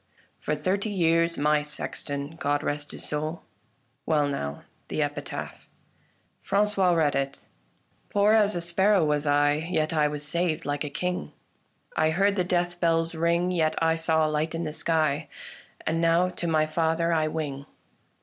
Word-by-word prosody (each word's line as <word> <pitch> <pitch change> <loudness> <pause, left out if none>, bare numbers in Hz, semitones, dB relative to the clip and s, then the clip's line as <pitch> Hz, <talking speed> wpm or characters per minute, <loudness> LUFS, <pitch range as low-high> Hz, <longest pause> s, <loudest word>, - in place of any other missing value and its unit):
For 150 - -1
thirty 190 +8 -1
years 170 -3 +2
my 150 +1 +3
sexton. 145 -1 -4
God 145 -2 0
rest 145 0 -2
his - - -7
soul! 155 +3 -3 0.6
Well 150 -2 +2
now, 70 - -4 0.2
the - - -4
epitaph." 145 0 -6 0.8
Frangois 195 -3 +2
read 155 -3 +2
it: 140 0 -3 0.3
" - - -40
Poor 205 +1 +3
as 210 -3 +4
a 175 - -1
sparrow 190 +2 +3
was 150 0 0
I, 145 +2 +2
Yet 155 -2 0
I 150 -2 +3
was 150 0 -4
saved 170 0 -1
like 145 +1 -2
a 150 - -4
king; 180 +5 -3 0.6
I 155 - +3
heard 195 +5 +2
the 185 - +1
death 175 -1 -1
bells 165 -1 +2
ring, 170 +2 +1
Yet 160 -3 +1
I 165 0 +2
saw 160 -1 +2
a - - +1
light 155 +2 -1
in 165 - -2
the 155 -2 -4
sky: 155 -3 0 0.6
And 165 +1 0
now 170 +2 +3
to 175 -1 -5
my 155 -1 +3
Father 165 +1 0
I 155 -1 +2
wing." 145 -3 -4
160 Hz, 170 wpm, -26 LUFS, 150-175 Hz, 0.8 s, as